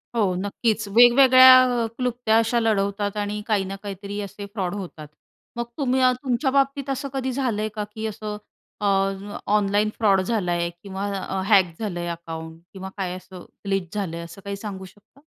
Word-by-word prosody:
हो. 205 -5 +2
नक्कीच. 205 +3 -1
वेगवेगळ्या 255 +4 +8 0.3
अ, - - 0
क्लुप्त्या 245 -3 +1
अशा 230 +1 +2
लढवतात 205 -2 0
आणि 210 0 -2
काही 210 -3 +1
ना - - -4
काहीतरी 200 0 -6
असे 200 +1 -7
फ्रॉड 190 -3 -2
होतात. 175 -6 -8 0.5
मग 235 0 -2
तुम्ही 260 -2 +1
अ, 255 0 +5
तुमच्याबाबतीत 275 +2 0
असं 270 +1 -3
कधी 265 -1 -2
झालं 245 -5 -1
आहे 215 - -1
का 210 - -2
की 220 0 -4
असं 210 0 -5 0.4
अ, - - -1 0.7
ऑनलाईन 210 0 +2
फ्रॉड 195 -4 +3
झाला 195 -3 -1
आहे 170 0 0
किंवा 195 0 -5 0.2
अ, 190 0 -3
हॅक 190 -5 +4
झालं 200 -6 -3
आहे 175 - -3
अकाउंट 165 -1 -7
किंवा 190 -1 -7
काय 185 -2 -3
असं 185 -1 -11 0.2
ग्लीच 195 -3 -2
झालं 190 -5 -3
आहे, 170 - -6
असं 170 +4 -12
काही 200 0 -3
सांगू 195 -2 -7
शकता? 205 +8 -20
205 Hz, 180 wpm, -23 LUFS, 190-235 Hz, 0.7 s, वेगवेगळ्या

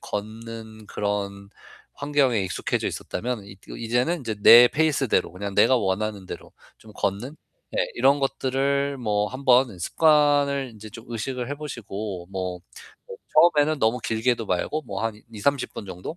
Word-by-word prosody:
걷는 110 +1 -7
그런 100 -1 -3 0.4
환경에 140 -6 +1
익숙해져 95 -2 -2
있었다면 120 0 -4
이 100 0 -12 0.2
이제는 120 +9 0
이제 115 -4 -3
내 120 +3 +10
페이스대로 145 -4 +1
그냥 100 +2 -6
내가 130 - +5
원하는 100 -1 -2
대로 - - -9 0.3
좀 110 - -15
걷는 110 +11 -3 0.4
네. - - +1
이런 140 +1 +4
것들을 140 +1 0
뭐 105 -3 0
한번 130 -6 +2
습관을 145 - +3
인제 110 0 -11
좀 115 +1 -11
의식을 120 +2 -4
해 - - -1
보시고 105 -10 -6
뭐 90 -1 -4 0.5
어 475 - -7 0.4
처음에는 150 +1 +2
너무 110 +3 +2
길게도 115 +1 0
말고 100 - -1
뭐 100 -1 -4
한 110 -2 -3
20-30 130 +5 -1
분 105 - -7
정도 90 - -7
115 Hz, 295 characters per minute, -24 LUFS, 105-140 Hz, 0.5 s, 내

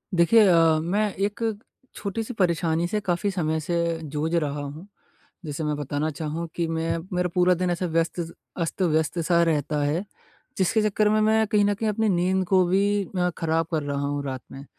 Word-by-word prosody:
देखिए 175 +7 +5
अ, 165 -3 +5
मैं 200 +5 0
एक 205 +4 -2 0.5
छोटी-सी 220 +4 -4
परेशानी 170 -4 +1
से 210 +4 -1
काफ़ी 180 +1 0
समय 160 -4 -1
से 170 +1 -1
जूझ 155 +2 -3
रहा 150 -3 -1
हूँ। 145 +6 -8 0.6
जैसे 150 +1 -4
मैं 150 -1 -1
बताना 145 +2 -2
चाहूँ 160 +3 -4
कि 170 -1 -1
मैं 165 0 -1 0.2
मेरा 180 0 +1
पूरा 180 0 +4
दिन 180 +1 -1
ऐसे 175 +1 -1
व्यस्त 165 +2 0 0.4
अस्त-व्यस्त 165 -1 0
सा 170 +1 +3
रहता 150 -2 0
है। 155 +7 -1 0.5
जिसके 195 +4 +2
चक्कर 215 0 +2
में 215 +1 +3
मैं 220 +1 +3
कहीं 210 -2 +3
न 205 - +2
कहीं 220 +2 -1
अपनी 215 +1 +1
नींद 185 +1 +1
को 185 -1 +4
भी 200 +2 +2
अ, 180 0 +2
ख़राब 165 0 0
कर 155 -3 0
रहा 140 0 -2
हूँ 145 0 -2
रात 130 -2 -4
में। 135 +1 -9
170 Hz, 185 wpm, -25 LUFS, 155-195 Hz, 0.6 s, देखिए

